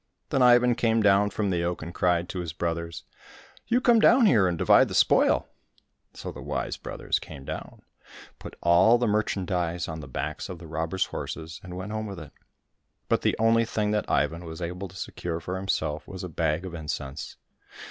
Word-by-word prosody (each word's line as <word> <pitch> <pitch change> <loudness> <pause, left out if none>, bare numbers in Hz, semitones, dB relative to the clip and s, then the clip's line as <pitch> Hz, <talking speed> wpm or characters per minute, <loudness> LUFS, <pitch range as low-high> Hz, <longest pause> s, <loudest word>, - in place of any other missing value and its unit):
Then 135 - +1
Ivan 125 0 +6
came 115 -1 +1
down 100 0 +4
from 100 0 -1
the 85 -1 0
oak 85 -1 -2
and 85 +2 -7
cried 90 -1 +1
to 95 - -4
his 85 -3 -4
brothers, 85 -1 -3 0.3
" - - -23
You 240 +2 +3
come 240 -2 +5
down 240 +2 +6
here 105 - +5
and 85 -2 -1
divide - - +5
the - - -5
spoil! - - +4 0.3
" - - -49
So - - -6
the - - -10
wise - - -3
brothers - - -3
came 70 - -10
down, - - -7 0.6
put - - -9
all 90 +8 +6
the 120 - 0
merchandise 90 -5 -1
on 80 -1 -5
the 75 - -8
backs 75 +7 -4
of 90 - -6
the 85 - -11
robbers' 80 +3 -1
horses, 80 0 -6
and 90 -1 -8
went 95 +3 -6
home 110 0 -3
with 100 -3 -7
it; 75 -3 -10 0.8
but - - +2
the - - +1
only 115 +1 +4
thing 105 -2 -1
that 105 0 -1
Ivan 85 +2 0
was 80 -1 -8
able 90 +3 -4
to 95 - -16
secure 85 -2 -4
for 90 +2 -5
himself 95 +1 -2
was 95 -1 -7
a 90 - -5
bag 80 +1 -1
of 90 - -7
incense. 75 -3 -5
90 Hz, 205 wpm, -26 LUFS, 85-105 Hz, 0.8 s, Ivan